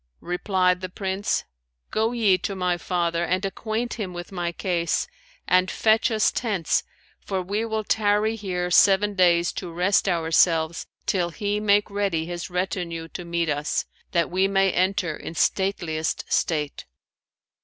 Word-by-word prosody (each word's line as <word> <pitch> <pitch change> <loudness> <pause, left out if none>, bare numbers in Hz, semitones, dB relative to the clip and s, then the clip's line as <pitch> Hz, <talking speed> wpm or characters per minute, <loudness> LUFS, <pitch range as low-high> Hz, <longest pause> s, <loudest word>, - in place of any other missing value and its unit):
Replied 180 0 +1
the 185 - -4
Prince, 190 +1 -2 0.5
'Go 220 +1 +1
ye 220 -6 +3
to 195 - -3
my 180 -1 0
father 170 -1 -1
and 185 +3 0
acquaint 225 +4 -3
him 190 -4 -4
with 175 +1 -7
my 175 -2 -2
case, 170 -1 -1 0.4
and 185 0 +3
fetch 220 +2 +3
us 220 -2 +2
tents, 205 -9 0 0.4
for 190 -2 -3
we 200 +5 -2
will 220 -1 -2
tarry 210 +1 +2
here 180 -4 -3
seven 200 +3 +5
days 175 -2 +3
to 180 -3 -6
rest 180 +4 +2
ourselves 165 -1 +2 0.2
till 175 -3 +1
he 205 +3 -2
make 205 -1 +3
ready 195 -6 0
his 175 +1 -5
retinue 175 -2 -3
to 180 - -7
meet 170 -1 -1
us, 150 0 -1 0.3
that 170 -1 +1
we 190 +2 +2
may 195 -1 +3
enter 180 -3 0
in 165 - -8
stateliest 170 -4 0
state.'" 150 -3 -1
185 Hz, 150 wpm, -24 LUFS, 170-205 Hz, 0.5 s, seven